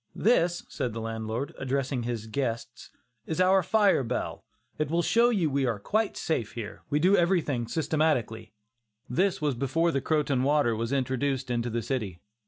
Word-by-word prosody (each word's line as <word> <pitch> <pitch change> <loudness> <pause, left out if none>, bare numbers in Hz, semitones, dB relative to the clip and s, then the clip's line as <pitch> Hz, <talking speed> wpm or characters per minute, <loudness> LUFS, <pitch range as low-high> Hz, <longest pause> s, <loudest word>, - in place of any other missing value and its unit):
"This," 175 -6 +2
said 120 -3 -3
the 115 - -4
landlord, 115 +3 -4
addressing 135 -1 -1
his 115 -2 -3
guests, 115 -1 -4 0.4
"is 160 - -3
our 190 +1 +5
fire 200 -4 +3
bell; 125 +1 -3 0.4
it 155 -2 0
will 170 +2 +1
show 235 +5 +4
you 195 -9 +1
we 140 -2 0
are 115 -3 0
quite 215 - -1
safe 115 -10 -2
here; 110 -3 -7
we 145 - +1
do 185 +6 +4
everything 165 - +1
systematically." 150 -7 0 0.6
This 180 +5 0
was 145 -2 +2
before 140 +7 +1
the 135 - -1
Croton 145 -3 +1
water 140 -4 +2
was 115 +2 -3
introduced 130 -1 -1
into 120 0 -1
the 115 0 -2
city. 105 -10 -3
135 Hz, 170 wpm, -28 LUFS, 120-165 Hz, 0.6 s, our